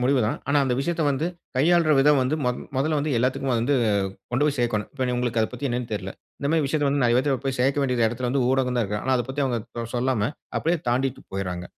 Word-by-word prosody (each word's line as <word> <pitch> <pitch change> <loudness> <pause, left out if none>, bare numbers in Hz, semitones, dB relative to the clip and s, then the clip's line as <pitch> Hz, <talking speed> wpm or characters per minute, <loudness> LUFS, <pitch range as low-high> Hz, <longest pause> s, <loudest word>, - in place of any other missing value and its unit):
முடிவு 130 +1 +3
தான். 110 - -1
ஆனா 145 - +3
அந்த 125 -2 +1
விஷயத்தை 170 +2 -1
வந்து 140 +4 0 0.3
கையாள்ற 165 +3 +4
விதம் 145 +1 +5
வந்து 130 +4 0
மொ 125 - +3 0.3
மொதல்ல 150 +3 +1
வந்து 145 -1 -1
எல்லாத்துக்கும் 130 +1 0
வந்து 120 +5 +1 0.6
கொண்டு 130 +5 +2
போய் 145 -1 0
சேர்க்கோணும். 115 -4 0
இப்ப 130 -3 -2
நீ 125 - 0
உங்களுக்கு 120 -2 0
அதை 110 - 0
பத்தி 125 +3 -3
என்னன்னு 120 -1 -3
தெர்ல. 95 -2 -3 0.3
இந்த 140 - -1
மாரி 160 -2 +2
விஷயத்தை 145 0 0
வந்து 140 0 +1
நெறைய 120 0 +4
பேத்துக்கு 135 0 0
போய் 135 -1 -2
சேர்க்க 140 +2 +2
வேண்டிய 125 -4 +2
இடத்தில 120 +2 -3
வந்து 135 -1 +1
ஊடகம் 130 -1 +1
தான் 120 - +2
இருக்கு. 105 +1 -3
ஆனா 130 - +2
அதை 120 - -1
பத்தி 140 +2 -2
அவங்க 120 -3 -1 0.2
தொ 115 - -2
சொல்லாம, 120 -3 +1 0.3
அப்படியே 170 +2 +1
தாண்டிட்டு 130 +2 0
போயிர்றாங்க. 90 -2 -3
130 Hz, 240 wpm, -24 LUFS, 120-140 Hz, 0.6 s, விதம்